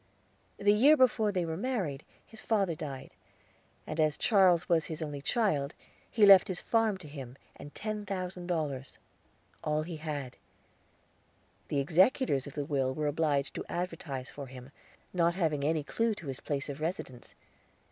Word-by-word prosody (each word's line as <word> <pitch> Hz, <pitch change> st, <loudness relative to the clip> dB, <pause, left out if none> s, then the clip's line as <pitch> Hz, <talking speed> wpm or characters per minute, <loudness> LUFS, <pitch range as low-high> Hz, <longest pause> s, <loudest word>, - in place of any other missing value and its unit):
The 205 Hz, 0 st, +4 dB
year 280 Hz, +9 st, +6 dB
before 220 Hz, -5 st, +3 dB
they 180 Hz, -3 st, -1 dB
were 160 Hz, -1 st, -3 dB
married 185 Hz, -, -2 dB, 0.2 s
his 220 Hz, -, -11 dB
father 200 Hz, -6 st, +1 dB
died, 145 Hz, -4 st, -7 dB, 0.7 s
and 155 Hz, -, -5 dB
as 155 Hz, -1 st, +2 dB
Charles 185 Hz, -6 st, +4 dB
was 165 Hz, -2 st, +3 dB
his 160 Hz, -2 st, -5 dB
only 145 Hz, -2 st, -5 dB
child, 155 Hz, -, 0 dB, 0.3 s
he 215 Hz, -3 st, +4 dB
left 195 Hz, -2 st, +8 dB
his 185 Hz, -2 st, -3 dB
farm 225 Hz, -3 st, +1 dB
to 180 Hz, -5 st, -12 dB
him, 135 Hz, -4 st, -8 dB, 0.2 s
and 145 Hz, -, -11 dB
ten 210 Hz, -1 st, -4 dB
thousand 185 Hz, -2 st, -4 dB
dollars 145 Hz, -6 st, -3 dB, 0.7 s
all 150 Hz, 0 st, 0 dB
he 165 Hz, 0 st, -6 dB
had. 145 Hz, -5 st, -5 dB, 1.3 s
The 140 Hz, -, 0 dB
executors 170 Hz, -, +3 dB
of 145 Hz, -, -9 dB
the 145 Hz, -2 st, -2 dB
will 135 Hz, -3 st, 0 dB
were 155 Hz, -, -2 dB
obliged 145 Hz, -2 st, 0 dB
to -, -, -5 dB
advertise 165 Hz, -7 st, -4 dB
for 140 Hz, -2 st, -8 dB
him, 130 Hz, +1 st, -11 dB, 0.4 s
not 170 Hz, -1 st, +2 dB
having 155 Hz, -6 st, 0 dB
any 155 Hz, +1 st, +1 dB
clue 225 Hz, +8 st, 0 dB
to 175 Hz, -, -10 dB
his 135 Hz, -2 st, -5 dB
place 140 Hz, -2 st, -3 dB
of 145 Hz, +1 st, -6 dB
residence. 155 Hz, -7 st, -5 dB
160 Hz, 165 wpm, -31 LUFS, 145-195 Hz, 1.3 s, left